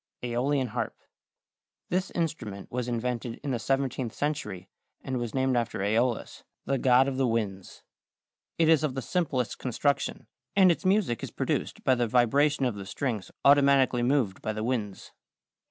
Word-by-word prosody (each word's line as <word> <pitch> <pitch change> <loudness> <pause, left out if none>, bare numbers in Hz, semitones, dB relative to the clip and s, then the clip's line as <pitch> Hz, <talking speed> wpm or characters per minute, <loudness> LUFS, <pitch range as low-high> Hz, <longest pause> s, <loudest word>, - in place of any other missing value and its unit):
=Æolian 125 +2 0
Harp.= - - -3 0.9
This 185 +2 0
instrument 125 - -3
was 125 0 -2
invented 120 0 -3
in 140 - -2
the 125 - 0
17th 135 -2 -1
century 140 -12 -3 0.4
and 130 -1 -2
was 120 -1 -4
named 130 -1 +2
after 115 -1 -1
Æolus, 115 +4 0 0.2
the 135 -1 0
god 130 +1 +5
of 135 -1 -2
the 135 -1 +2
winds. 105 -5 -3 0.7
It 165 - +3
is 160 -2 +5
of 140 -4 -1
the 135 - -3
simplest 135 - -1
construction, 135 +3 -1 0.3
and 190 -2 +6
its 170 - -3
music 185 - +2
is - - -5
produced - - -2
by 130 - +4
the 120 -1 +1
vibration 135 +5 +3
of 125 - 0
the 100 -1 -8
strings 110 -2 -3 0.2
automatically 140 -3 +5
moved 120 -6 +1
by 110 - -2
the 110 0 -4
winds. 110 -5 -3
125 Hz, 160 wpm, -28 LUFS, 115-140 Hz, 0.9 s, and